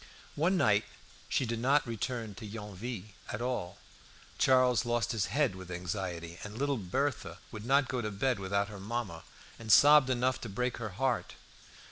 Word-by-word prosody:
One 175 +6 +2
night 105 -9 +3 0.4
she 130 - +1
did 115 -1 -2
not 140 +5 +3
return 115 -1 -3
to 110 +2 -9
Yonville 105 0 -6 0.2
at 105 - -3
all. 120 -7 -3 0.6
Charles 130 -4 +4
lost 120 0 0
his 110 -6 0
head 135 +3 +1
with 95 -1 -10
anxiety, 85 -1 -4
and 105 +1 -7
little 140 +1 0
Berthe 130 +9 -2
would 110 0 -7
not 140 0 +4
go 125 -2 -2
to 105 - -2
bed 115 +3 0
without 100 +1 0
her 105 -2 -8
mamma, 100 -5 -4 0.4
and 110 -1 -2
sobbed 145 +3 +8
enough 130 0 +1
to 115 - -5
break 125 +5 -2
her 110 -2 -4
heart. 130 -1 0
115 Hz, 170 wpm, -31 LUFS, 100-130 Hz, 0.6 s, sobbed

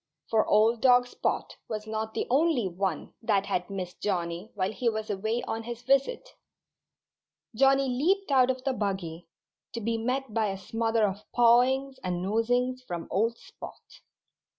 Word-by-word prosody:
For 220 -1 +3
old 220 +2 +3
dog 250 -1 +6
Spot 245 - -3
was 215 -2 -4
not 220 0 -4
the - - -1
only 275 - +3
one 185 -2 -3
that 205 -4 +1
had 180 +1 -2
missed 185 -2 -6
Johnnie 175 0 -2
while 190 0 0
he 240 +2 0
was 215 -1 -3
away 220 +5 -1
on 225 -2 -3
his 240 +1 -7
visit. 275 - +1 1.3
Johnnie 270 +3 +4
leaped 325 +9 +1
out 260 -2 +5
of 255 0 -2
the 270 -1 0
buggy, 185 -7 -3 0.5
to 230 - -3
be 230 +1 -1
met 255 +1 -2
by 220 -1 +1
a 195 -1 -3
smother 225 +3 0
of 200 +2 -7
pawings 255 +3 +4
and 180 -1 -2
nosings 245 +5 0
from 175 -9 -6
old 230 +4 +1
Spot. - - -11
225 Hz, 160 wpm, -28 LUFS, 200-255 Hz, 1.3 s, dog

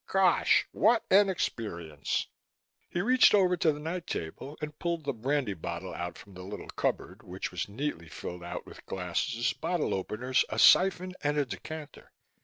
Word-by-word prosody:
Gosh! 190 -2 +4
what 225 +3 +3
an 200 +1 +6
experience!" 85 - -2 0.6
He 175 - -1
reached 250 +2 +6
over 185 -3 +4
to 160 -2 +3
the 145 - -6
night 170 +3 -4
table 135 - -5
and 150 -1 -6
pulled 170 -2 -1
the 140 -1 -1
brandy 130 -1 -1
bottle 85 +1 -5
out 85 0 -5
from 100 - -14
the 90 - -9
little 100 +3 -8
cupboard, - - -2
which 90 +2 -5
was 90 +2 -3
neatly 100 - -4
fitted 90 +3 -7
out 85 +1 -6
with - - -13
glasses, 95 +6 -1
bottle 170 0 -1
openers, 120 +7 0
a - - -4
syphon 185 -1 +5
and 145 0 0
a 145 - +2
decanter. 155 +3 -8
140 Hz, 170 wpm, -30 LUFS, -, 0.6 s, an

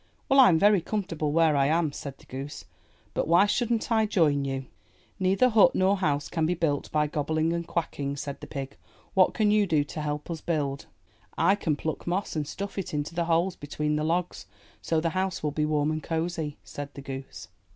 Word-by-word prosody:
'Well, 275 - +5
Vm 190 -11 +7
very 205 +1 +5
comfortable 165 -6 -2
where 160 -1 +4
I 140 -1 +3
am," 160 0 +2
said 140 -1 -7
the - - -19
goose. 135 +3 -7 0.5
But - - -1
why 170 +4 +6
shouldn't 235 +2 0
I 220 -1 +3
join 150 -9 +2
you?" 135 -1 -3 0.6
^'Neither 195 +7 +3
hut 220 -2 +5
nor 190 +2 +3
house 150 -6 0
can 160 -2 0
be 180 - +1
built 155 -4 -1
by 150 0 +2
gobbling 155 +2 0
and 170 -1 -3
quacking," 140 -4 -2
said 140 0 -5
the - - -8
pig. 135 -1 -6 0.4
'*What 190 -1 +4
can 215 -2 +3
you 210 -1 +3
do 155 -4 +2
to 155 +2 -6
help 150 +2 -3
us 160 -2 -5
build?" 140 -4 -2 0.5
I 195 - +4
can 165 -7 0
pluck 160 +3 -4
moss 185 +2 -1
and 150 -2 -2
stuff 200 +5 -5
it 180 - -4
into 145 +2 -3
the 170 0 0
holes 170 +2 +1
between 150 +1 -2
the 150 - -1
logs 175 +3 -1 0.3
so 160 - 0
the 165 +1 0
house 185 -2 -2
will 150 - 0
be 150 +1 0
warm 150 0 +1
and 155 0 -2
cosy," 160 -2 -3
said 145 0 -7
the 140 - -7
goose. 135 0 -8
160 Hz, 210 wpm, -27 LUFS, 145-185 Hz, 0.6 s, Vm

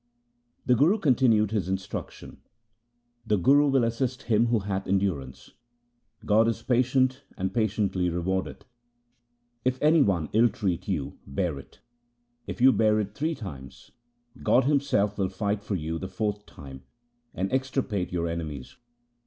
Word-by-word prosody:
The 125 - +4
Guru 155 - +4
continued 120 - +3
his 105 -4 -1
instructions: 95 0 -6 0.3
— 120 +2 -49
' 120 -1 -35
The 105 -1 +2
Guru 140 +10 +4
will 135 -3 +3
assist 120 +2 -2
him 115 +1 +2
who 115 -2 +1
hath 95 -1 -3
endurance; 95 -9 -2 0.7
God 110 +2 +4
is 115 0 -2
patient 130 +2 +1 0.2
and 95 0 -2
patiently 105 -5 0
rewardeth. 90 +2 -3 1.0
If 130 0 0
any 155 +1 +4
one 90 - +1
ill 115 +3 +5
treat 95 -7 -3
you, - - -3
bear 75 +1 -2
it. - - -16 0.7
If - - -6
you 130 +2 +7
bear 110 -3 +2
it 100 -1 -3
three 155 +6 -2
times, 70 - -10 0.5
God 130 - +3
Himself 130 -8 +1
will 95 -1 +1
fight 100 +1 -2
for 105 - -3
you 80 -1 -3
the 95 - -5
fourth 105 0 -3
time, 65 -2 -11 0.5
and 95 +4 -2
extirpate 130 -7 -1
your 85 -1 -1
enemies.' 80 -6 -6
105 Hz, 150 wpm, -26 LUFS, 95-125 Hz, 1.0 s, you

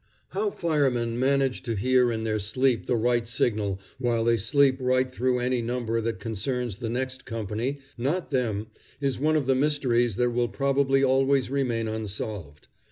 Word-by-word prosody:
How 415 +1 -1
firemen 135 - 0
manage 135 0 +1
to 115 -3 -3
hear 125 +3 +3
in 110 -1 -2
their 110 -1 0
sleep 125 +4 0
the 125 - +2
right 120 0 +1
signal, 105 -4 0 0.2
while 120 -3 +1
they 115 0 +3
sleep 130 +5 +3
right 130 0 +2
through 125 0 +1
any 125 0 0
number 115 -1 -1
that 115 -3 -3
concerns 115 +1 -3
the 115 -2 -3
next 130 +2 -3
company, 115 +3 -3 0.2
not 155 +9 -1
them, 110 -6 0 0.3
is 140 -3 -1
one 155 +3 +2
of 150 -3 +1
the 135 - +3
mysteries 130 -5 +1
that 120 +2 +1
will 120 0 0
probably 135 +4 +2
always 135 0 +2
remain 120 -5 0
unsolved. 105 -8 -5
125 Hz, 165 wpm, -26 LUFS, 115-135 Hz, 0.3 s, hear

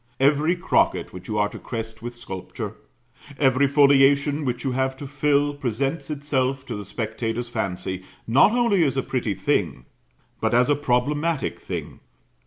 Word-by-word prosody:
Every 150 +5 +3
crocket 180 +2 +1
which 90 0 -10
you 105 - -2
are 105 0 +3
to - - -9
crest 115 -1 -6
with 120 +1 -6
sculpture, 95 -6 -6 0.6
every 135 0 +3
foliation 140 +1 +4
which 125 -2 -2
you 135 - 0
have 130 +1 -1
to 140 - -7
fill, 145 +1 +1
presents 135 +3 -2
itself 135 -3 -1
to - - -5
the 105 -1 -6
spectator's 115 +3 -3
fancy, 95 -4 -3 0.2
not 130 - +5
only 235 -7 +3
as 135 -3 0
a 135 - +1
pretty 115 -6 -2
thing, 65 -8 -1 0.5
but - - +1
as 125 +4 +4
a - - +4
problematic 145 +3 0
thing. - - -6
135 Hz, 160 wpm, -24 LUFS, 115-145 Hz, 0.6 s, not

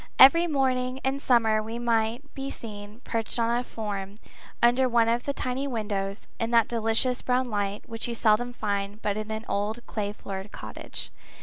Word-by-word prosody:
Every 335 +6 +8
morning 260 -4 +1
in 270 +1 0
summer 225 -5 +3
we 225 +2 -5
might 235 +3 0
be 270 0 -4
seen 210 -2 -7
perched 225 0 -2
on 230 0 +2
a 245 - 0
form, 205 -4 -5 0.4
under 245 +2 +4
one 230 -1 +4
of 235 +1 +1
the 280 - 0
tiny 260 +1 -2
windows, 205 -5 -3
in 230 - 0
that 230 -2 +4
delicious 230 +2 +1
brown 250 -1 0
light 205 0 -2
which 225 +1 -3
you 235 - -3
seldom 225 +2 +3
find 205 -3 -2
but 205 -1 0
in 215 0 -4
an 220 +1 -4
old 215 +4 -2
clay 205 -2 -3
floored 195 0 -7
cottage. - - -6
230 Hz, 180 wpm, -27 LUFS, 210-250 Hz, 0.4 s, Every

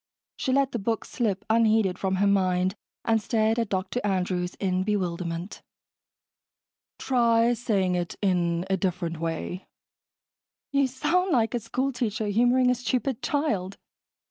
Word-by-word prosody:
She 260 - -2
let 275 0 +2
the 235 - -2
book 225 +3 -2
slip 210 -4 -2
unheeded 220 -4 +3
from 190 -1 0
her 195 +2 +2
mind 185 -2 +2 0.3
and 225 -1 +2
stared 220 +1 +1
at 230 -3 -1
Dr. 190 +6 -2
Andrews 180 -2 -1
in 185 -2 0
bewilderment. 180 -3 -3 1.4
"Try 235 -2 +3
saying 205 -6 0
it 175 -1 -2
in 175 -3 +1
a 190 - +1
different 175 -3 -2
way." 165 +3 -4 1.0
"You 280 -1 +3
sound 355 +9 0
like 230 -4 +2
a 240 - 0
school 260 +5 -2
teacher 225 -4 -2
humoring 245 +4 +3
a - - +4
stupid 250 +1 -2
child." 210 -11 -1
210 Hz, 140 wpm, -26 LUFS, 185-240 Hz, 1.4 s, a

